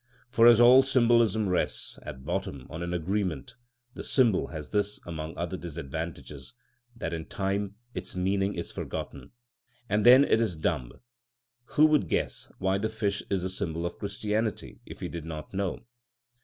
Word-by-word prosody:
For 115 Hz, -1 st, +6 dB
as 120 Hz, -1 st, +8 dB
all 125 Hz, +2 st, +8 dB
symbolism 120 Hz, -5 st, +3 dB
rests, 90 Hz, -1 st, -1 dB
at 65 Hz, 0 st, -9 dB
bottom, 65 Hz, -3 st, -3 dB
on 85 Hz, -, -6 dB
an 85 Hz, 0 st, -3 dB
agreement, 90 Hz, -, -2 dB, 0.4 s
the -, -, -7 dB
symbol 120 Hz, -8 st, +3 dB
has 75 Hz, -3 st, -8 dB
this 105 Hz, -1 st, 0 dB
among 80 Hz, -2 st, -6 dB
other 85 Hz, +2 st, -3 dB
disadvantages, 80 Hz, -, -7 dB, 0.4 s
that 85 Hz, -7 st, -4 dB
in 80 Hz, -1 st, -4 dB
time 100 Hz, +1 st, -2 dB, 0.2 s
its -, -, -5 dB
meaning 95 Hz, +2 st, 0 dB
is 85 Hz, -, -5 dB
forgotten, -, -, -6 dB, 0.6 s
and 105 Hz, 0 st, +1 dB
then 130 Hz, +4 st, +8 dB
it 110 Hz, -, +3 dB
is 105 Hz, -7 st, 0 dB
dumb. 75 Hz, -6 st, -2 dB, 0.8 s
Who 155 Hz, -, +7 dB
would 155 Hz, -2 st, +3 dB
guess -, -, -2 dB
why 95 Hz, +1 st, 0 dB
the 110 Hz, +2 st, -1 dB
fish 105 Hz, -2 st, -1 dB
is 95 Hz, -2 st, 0 dB
a -, -, 0 dB
symbol 85 Hz, -2 st, -2 dB
of 85 Hz, -, -5 dB
Christianity 105 Hz, +1 st, -2 dB
if -, -, -10 dB
he -, -, -2 dB
did 85 Hz, -2 st, -6 dB
not 80 Hz, +1 st, -7 dB
know? 95 Hz, -1 st, -2 dB
95 Hz, 165 wpm, -28 LUFS, 85-110 Hz, 0.8 s, as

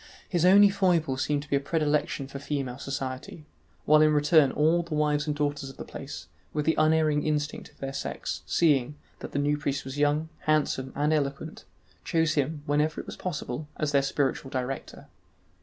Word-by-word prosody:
His 175 Hz, -3 st, +1 dB
only 200 Hz, +2 st, +8 dB
foible 170 Hz, -8 st, +2 dB
seemed 145 Hz, +2 st, -1 dB
to -, -, -15 dB
be -, -, +4 dB
a -, -, +3 dB
predilection 150 Hz, -1 st, 0 dB
for 140 Hz, 0 st, -7 dB
female 135 Hz, -3 st, -3 dB
society; 140 Hz, +6 st, -5 dB, 0.4 s
while 155 Hz, 0 st, +6 dB
in 155 Hz, 0 st, +5 dB
return 150 Hz, -1 st, +5 dB
all 160 Hz, +3 st, +3 dB
the 170 Hz, -2 st, -5 dB
wives 150 Hz, 0 st, +1 dB
and 150 Hz, -, 0 dB
daughters 145 Hz, -2 st, -2 dB
of 135 Hz, -, -13 dB
the -, -, -7 dB
place, -, -, -8 dB, 0.3 s
with 150 Hz, -1 st, -1 dB
the 160 Hz, -, +3 dB
unerring 155 Hz, -1 st, +3 dB
instinct 150 Hz, -1 st, -2 dB
of -, -, -27 dB
their 135 Hz, 0 st, -5 dB
sex, -, -, -4 dB
seeing, 145 Hz, -4 st, +2 dB, 0.2 s
that -, -, -8 dB
the -, -, -3 dB
new 145 Hz, +1 st, +1 dB
priest 140 Hz, -2 st, -2 dB
was 135 Hz, +2 st, -6 dB
young, 150 Hz, +2 st, +1 dB, 0.2 s
handsome, 145 Hz, -4 st, +1 dB
and 150 Hz, +2 st, +1 dB
eloquent, 145 Hz, +1 st, -3 dB, 0.4 s
chose 160 Hz, -3 st, +1 dB
him, 145 Hz, +1 st, -1 dB
whenever 150 Hz, +2 st, +1 dB
it -, -, -6 dB
was -, -, -7 dB
possible, 150 Hz, -5 st, -4 dB
as 150 Hz, -1 st, -1 dB
their 140 Hz, -1 st, +4 dB
spiritual 135 Hz, -1 st, -1 dB
director. 130 Hz, 0 st, -5 dB
150 Hz, 190 wpm, -27 LUFS, 140-155 Hz, 0.4 s, only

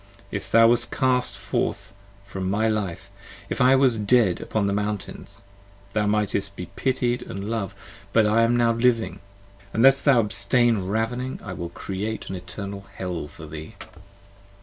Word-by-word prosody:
If -, -, -4 dB
thou 115 Hz, 0 st, +7 dB
wast 120 Hz, 0 st, +3 dB
cast 130 Hz, -2 st, +1 dB
forth -, -, -3 dB, 0.3 s
from 95 Hz, -1 st, -4 dB
my 105 Hz, +3 st, +1 dB
life: 100 Hz, -3 st, -3 dB, 0.4 s
if -, -, -2 dB
I 130 Hz, +1 st, +6 dB
was 130 Hz, -4 st, +3 dB
dead 105 Hz, -4 st, +3 dB
upon 110 Hz, -2 st, -1 dB
the 100 Hz, -, 0 dB
mountains 105 Hz, -1 st, -4 dB, 0.5 s
Thou 105 Hz, -1 st, +1 dB
mightest 100 Hz, -1 st, 0 dB
be 90 Hz, -, -6 dB
pitied 125 Hz, -2 st, 0 dB
& -, -, -11 dB
Jov'd: 100 Hz, 0 st, -4 dB, 0.4 s
but 110 Hz, 0 st, +4 dB
now 105 Hz, -, +2 dB
I 115 Hz, -, +4 dB
am 115 Hz, +1 st, +3 dB, 0.2 s
living: 115 Hz, -6 st, +1 dB, 0.5 s
unless 135 Hz, +4 st, +6 dB
Thou 135 Hz, -4 st, +5 dB
abstain 105 Hz, 0 st, +2 dB
ravening 120 Hz, +5 st, -2 dB
I 100 Hz, -, -6 dB
will 85 Hz, -1 st, -5 dB
create 100 Hz, +5 st, -5 dB
an -, -, -3 dB
eternal 100 Hz, +2 st, -7 dB
Hell 90 Hz, -5 st, -4 dB
for 75 Hz, -, -11 dB
thee. 80 Hz, 0 st, -9 dB
105 Hz, 155 wpm, -24 LUFS, 100-120 Hz, 0.5 s, thou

